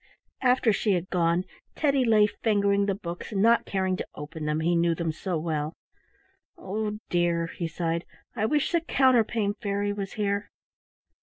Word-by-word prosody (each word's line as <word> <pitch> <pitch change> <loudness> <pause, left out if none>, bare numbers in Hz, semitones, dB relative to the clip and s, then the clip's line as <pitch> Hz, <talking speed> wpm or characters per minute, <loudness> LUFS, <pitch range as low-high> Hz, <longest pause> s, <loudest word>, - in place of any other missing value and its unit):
After 250 -3 +3
she 205 0 +1
had 180 0 -2
gone 175 0 +2 0.3
Teddy 280 -3 +2
lay 215 -2 +5
fingering 200 -2 +1
the 195 - +1
books 175 -1 -7
and 195 0 +1
not 230 +1 +4
caring 190 -1 0
to - - -5
open 150 +1 -7
them, 150 +1 0
he 170 +2 +2
knew 170 0 +2
them 165 -1 -1
so 175 +2 -3
well. 155 -1 -2 0.8
"Oh 210 +2 -3
dear!" 175 -1 +1
he 170 - -2
sighed, 165 +1 -2 0.3
"I 215 -2 +1
wish 295 +3 +1
the 340 - +2
Counterpane 235 -8 +2
Fairy 205 -1 -1
was 200 -1 -5
here!" 200 -1 -1
200 Hz, 165 wpm, -27 LUFS, 170-215 Hz, 0.8 s, lay